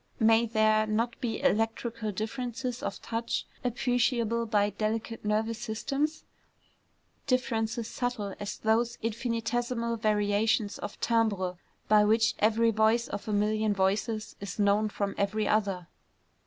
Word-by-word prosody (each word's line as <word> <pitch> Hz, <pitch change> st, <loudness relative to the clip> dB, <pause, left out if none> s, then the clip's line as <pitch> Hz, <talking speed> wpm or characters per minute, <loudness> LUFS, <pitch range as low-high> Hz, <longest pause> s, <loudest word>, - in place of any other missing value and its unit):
May 225 Hz, 0 st, +5 dB
there 215 Hz, 0 st, +3 dB
not 230 Hz, +4 st, -1 dB
be 240 Hz, +2 st, -2 dB
electrical 225 Hz, -2 st, 0 dB
differences 245 Hz, +4 st, -4 dB
of -, -, -4 dB
touch 230 Hz, 0 st, -2 dB, 0.2 s
appreciable 240 Hz, -2 st, +1 dB
by 205 Hz, -1 st, +2 dB
delicate 225 Hz, +2 st, -3 dB
nervous 220 Hz, +2 st, 0 dB
systems, 275 Hz, +7 st, -2 dB, 1.0 s
differences 235 Hz, -3 st, 0 dB
subtle 245 Hz, -6 st, -3 dB
as 205 Hz, 0 st, -4 dB
those 230 Hz, +2 st, +1 dB
infinitesimal 235 Hz, +1 st, -1 dB
variations 210 Hz, -1 st, +1 dB
of -, -, -6 dB
timbre 200 Hz, -6 st, +1 dB, 0.3 s
by 210 Hz, 0 st, +6 dB
which 220 Hz, +1 st, +3 dB
every 225 Hz, +2 st, +3 dB
voice 220 Hz, +2 st, +2 dB
of 200 Hz, -, -5 dB
a -, -, -1 dB
million 210 Hz, 0 st, +1 dB
voices 210 Hz, +3 st, 0 dB
is 200 Hz, -2 st, -6 dB
known 205 Hz, +1 st, +3 dB
from 200 Hz, -1 st, -2 dB
every 210 Hz, +1 st, 0 dB
other? 195 Hz, -5 st, 0 dB
220 Hz, 125 wpm, -29 LUFS, 210-235 Hz, 1.0 s, by